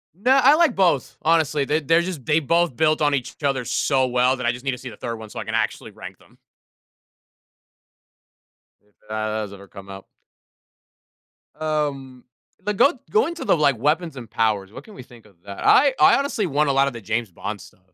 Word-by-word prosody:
No, 240 +8 +2
I 275 +3 +7
like 315 -5 +3
both, 175 -8 +1
honestly, 155 -3 +2
they 150 +3 0
they're 165 +3 +2
just 170 -6 -5
they 150 +5 +2
both 170 -1 +1
built 155 +1 +2
on 145 -1 +2
each 130 -3 -5
other 135 -3 0
so 130 +2 +1
well 125 +1 +2
that 130 -2 -6
I 120 - +3
just 125 +1 -9
need 135 - -1
to 125 - -5
see 130 0 -9
the - - -13
third 115 -1 -5
one 110 -1 -10
so - - -7
I - - -4
can - - -4
actually - - -2
rank - - -11
them. - - -24 2.4
If 105 0 -36
that 110 0 -3
has 110 -2 -4
ever 100 0 -13
come 100 +1 -13
up. 95 0 -10 1.5
Um, 145 -5 -3 0.4
like, 210 -1 -2
go 275 +6 +5 0.2
go 435 +1 +3
into 340 0 -6
the, - - +3
like, 145 -5 +2
weapons 155 +6 0
and 120 -4 -10
powers. 105 -4 -1
What - - -11
can 215 - -15
we - - -10
think 120 -2 -18
of 100 -3 -21
that? 100 -1 -7
I 275 0 +5
I - - +6
honestly 275 -7 -1
want 150 -2 0
a - - +2
lot 135 +1 +3
of 140 - -3
the 115 - -9
James 110 0 -3
Bond 100 +3 -6
stuff, - - -17
135 Hz, 215 wpm, -22 LUFS, 115-160 Hz, 2.4 s, I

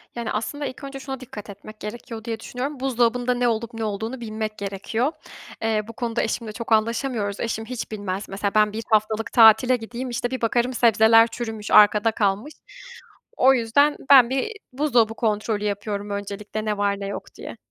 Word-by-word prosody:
Yani, 235 -2 -4
aslında 285 +7 -3
ilk 260 - -7
önce 275 0 -7
şuna 270 -1 -6
dikkat 220 -5 -10
etmek 215 +2 -11
gerekiyor 225 +1 -7
diye 225 -1 -4
düşünüyorum. 260 +5 -5
Buzdolabında 245 -1 +1
ne 245 0 +1
olup 230 0 -2
ne 225 - -4
olduğunu 220 +4 -4
bilmek 215 -1 -4
gerekiyor. 200 +7 -2 0.5
Eee, 220 -1 +1
bu 230 - -9
konuda 235 0 -2
eşimle 225 0 -3
çok 230 +2 -8
anlaşamıyoruz. 220 -2 0
Eşim 220 -1 -3
hiç 245 -1 -6
bilmez. 200 -2 -4
Mesela 200 +1 -2
ben 210 -1 +4
bir 225 +1 -4
haftalık 215 +1 +1
tatile 230 +2 +7
gideyim, 245 +2 -6
işte, 245 +1 -3
bir 260 - -4
bakarım 240 +2 +1
sebzeler 225 -1 +5
çürümüş, 225 -3 -6
arkada 210 +1 +6
kalmış. 210 +7 -1 0.8
O 265 +1 +6
yüzden 265 +5 +3
ben 260 -4 +8
bir 270 +11 -1 0.2
buzdolabı 245 -5 +2
kontrolü 215 -1 -1
yapıyorum 205 0 -3
öncelikle, 205 +1 -5
ne 210 -1 -1
var 200 -1 0
ne 200 - -4
yok 200 - -5
diye. - - -9
225 Hz, 175 wpm, -23 LUFS, 210-245 Hz, 0.8 s, ben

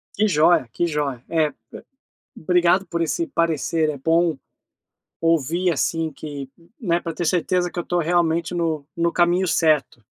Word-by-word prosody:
Que 215 +2 +2
joia, 155 - +3
que 175 - -1
joia. 145 -6 -2
É, 160 -2 +1
be 135 - -18 0.9
obrigado 180 +2 +3
por 170 0 -2
esse 165 +1 -1
parecer, 165 -1 0
é 145 - -4
bom 165 +1 +1 0.8
ouvir, 165 +2 +1
assim, 160 +2 -1
que, 140 -2 -8
n 170 - -23
né, 175 -5 +1
para 165 -2 -5
ter 175 - -3
certeza 180 +1 +1
que - - -8
eu 175 - -2
estou 175 0 0
realmente 170 0 +1
no 160 -4 -1
no 170 0 +1
caminho 175 +2 +2
certo. 155 -8 +1
165 Hz, 165 wpm, -22 LUFS, 155-175 Hz, 0.9 s, joia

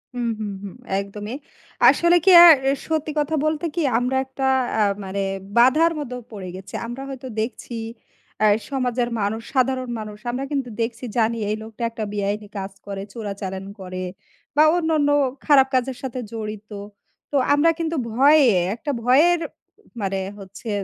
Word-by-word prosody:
হু, - - -4 0.2
হু, 215 - -3 0.2
হু। 200 - -5 0.3
একদমই। 205 +4 -6 0.5
আসলে 345 +1 +4
কি 380 - +7
আ - - +11 0.4
সত্যি 315 -1 -1
কথা 315 +2 0
বলতে 310 +1 0
কি 340 - 0 0.2
আমরা 250 +2 0
একটা 265 0 -4 0.3
আ - - +4 0.2
মানে 195 +1 -3 0.4
বাধার 305 +8 +5
মধ্যে 250 -4 -5 0.2
পড়ে 195 -3 -7
গেছি। 190 +1 -11
আমরা 240 +3 -6
হয়তো 260 -1 -7
দেখছি 235 +1 -5 0.7
অ্যা 215 - +4 0.2
সমাজের 250 -2 0
মানুষ, 215 +3 -1
সাধারণ 255 -1 +1
মানুষ 210 -1 -7
আমরা 260 +3 -3
কিন্তু 270 -4 -2
দেখছি 230 +2 -3
জানি 230 0 +2
এই 215 - 0
লোকটা 220 +1 -8
একটা 230 -1 -5
বেআইনি 205 +1 -2
কাজ 195 0 -4
করে, 195 -1 -5
চোরাচালান 195 -4 -5
করে 185 0 -6 0.5
বা 300 - +6
অন্যান্য 315 -3 +1 0.4
খারাপ 275 -3 +6
কাজের 255 0 0
সাথে 255 -1 -4
জড়িত। 215 -1 -6 0.6
তো - - -3 0.2
আমরা 300 +3 +4
কিন্তু 330 0 -1 0.2
ভয়ে, 280 +5 +6 0.3
একটা 290 +4 -4
ভয়ের 315 +8 +5 0.6
মানে 195 0 -1 0.2
হচ্ছে 195 +4 -9
245 Hz, 155 wpm, -22 LUFS, 210-280 Hz, 0.7 s, আ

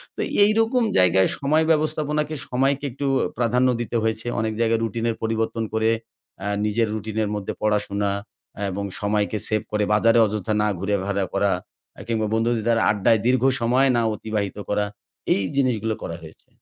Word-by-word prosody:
তো - - -3 0.2
এইরকম 225 +4 +3
জায়গায় 95 +1 +4
সময় 155 +3 +2
ব্যবস্থাপনাকে 150 0 0
সময়কে 135 +3 +1
একটু 140 +2 -3 0.3
প্রাধান্য 125 +2 +2
দিতে 120 - -4
হয়েছে। 110 +1 -1
অনেক 110 0 -1
জায়গায় 115 0 +2
রুটিনের 115 +1 -1
পরিবর্তন 115 0 -1
করে 110 0 +2 0.6
আ - - -1 0.2
নিজের 110 +2 +1
রুটিন 110 0 -5
এর 105 - -2
মধ্যে 100 -2 -4
পড়াশোনা 105 -1 0 0.6
এবং 100 +2 -3 0.2
সময়কে 105 +1 0
সেভ 110 -1 0
করে 105 0 +1
বাজারে 115 +2 +4
অযথা 105 0 -2
না 105 - +2
ঘুরাফেরা 100 0 -1
করা, 100 0 +2 0.4
অ্যা - - -10
কিংবা 110 -2 0
বন্ধুদের 115 0 +1
আড্ডায় 110 +2 +3
দীর্ঘ 130 0 +2 0.2
সময় 125 +4 +3
না 120 - +3
অতিবাহিত 105 -2 -3
করা, 105 0 +1 0.5
এই 100 - 0
জিনিসগুলো 115 -5 +1
করা 85 - -4
হয়েছে। 80 0 -14
110 Hz, 155 wpm, -23 LUFS, 105-125 Hz, 0.6 s, জায়গায়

